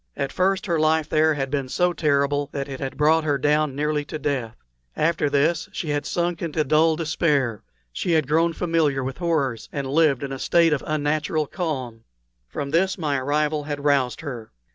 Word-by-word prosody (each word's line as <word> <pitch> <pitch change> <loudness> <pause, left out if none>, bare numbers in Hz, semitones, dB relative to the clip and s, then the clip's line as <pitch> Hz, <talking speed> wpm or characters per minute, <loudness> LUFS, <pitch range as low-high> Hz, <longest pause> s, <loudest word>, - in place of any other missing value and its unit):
At 140 -1 -2
first 190 +1 +1
her 170 -3 0
life 155 0 +1
here 155 0 +3
had 135 -2 -3
been 140 -3 -2
so 180 +5 +1
terrible 145 -2 +1
that 140 -1 -3
it 135 -1 -7
had 135 -2 -5
brought 155 +2 +3
her 145 -2 +1
down 150 0 +1
nearly 150 +1 0
to 155 - -5
death. 130 -7 -2 0.4
After 160 -2 +1
this 155 +4 +1
she 160 - -4
had 145 0 -1
sunk 175 -1 -1
into 160 -2 -1
dull 155 +3 +3
despair; 150 - 0 0.3
she 170 - -1
had 155 -4 +2
grown 165 +3 +2
familiar 160 -6 0
with 130 +3 -5
horrors 140 -10 -1
and 140 -2 -3
lived 140 -1 +2
in 140 - -4
a 135 - -5
state 165 +1 +3
of 150 - -2
unnatural 155 +1 0
calm. 130 -10 -4 0.4
From 140 -2 -5
this 190 +5 +2
my 150 -6 -1
arrival 150 +2 0
had 145 -1 -4
roused 135 -5 +2
her. 125 -7 -7
150 Hz, 190 wpm, -23 LUFS, 140-160 Hz, 0.4 s, here